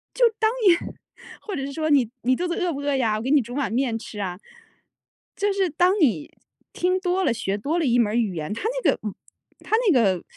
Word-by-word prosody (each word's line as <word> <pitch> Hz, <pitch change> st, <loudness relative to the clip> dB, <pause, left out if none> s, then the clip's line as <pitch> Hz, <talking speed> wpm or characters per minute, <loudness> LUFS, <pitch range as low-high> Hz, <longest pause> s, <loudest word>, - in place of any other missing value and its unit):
就 -, -, +4 dB
当 445 Hz, -, -18 dB, 0.9 s
年 -, -, -14 dB
或 410 Hz, -, -5 dB
者 270 Hz, -, -3 dB
是 280 Hz, -, -5 dB
说： 315 Hz, +2 st, -2 dB
“你 265 Hz, -6 st, +4 dB
你 255 Hz, +1 st, +3 dB
肚 355 Hz, +6 st, -2 dB
子 345 Hz, -, -2 dB
饿 360 Hz, -2 st, -1 dB
不 280 Hz, -, -5 dB
饿 285 Hz, 0 st, 0 dB
呀？ 225 Hz, -5 st, +1 dB
我 -, -, -4 dB
给 250 Hz, -, -3 dB
你 295 Hz, -2 st, +5 dB
煮 240 Hz, +1 st, -8 dB
碗 275 Hz, -7 st, -1 dB
面 240 Hz, -1 st, 0 dB
吃 220 Hz, -2 st, -9 dB
啊。” 185 Hz, -2 st, -4 dB, 1.0 s
就 410 Hz, 0 st, +1 dB
是 390 Hz, -2 st, +1 dB
当 360 Hz, +6 st, +2 dB
你 215 Hz, -, +1 dB, 0.4 s
听 365 Hz, +1 st, +1 dB
多 370 Hz, 0 st, 0 dB
了， 265 Hz, -, +2 dB
学 200 Hz, -3 st, -2 dB
多 290 Hz, +11 st, -1 dB
了 325 Hz, -, 0 dB
一 245 Hz, -2 st, +3 dB
门 230 Hz, -, +3 dB
儿 -, -, -1 dB
语 220 Hz, -6 st, 0 dB
言， 155 Hz, +2 st, -4 dB
它 225 Hz, -, -6 dB, 0.2 s
那 -, -, +5 dB
个 -, -, -4 dB
嗯， 210 Hz, -2 st, -4 dB, 0.5 s
它 440 Hz, -, 0 dB, 0.2 s
那 -, -, +4 dB
个 195 Hz, -9 st, +2 dB
270 Hz, 260 characters per minute, -24 LUFS, 220-350 Hz, 1.0 s, 你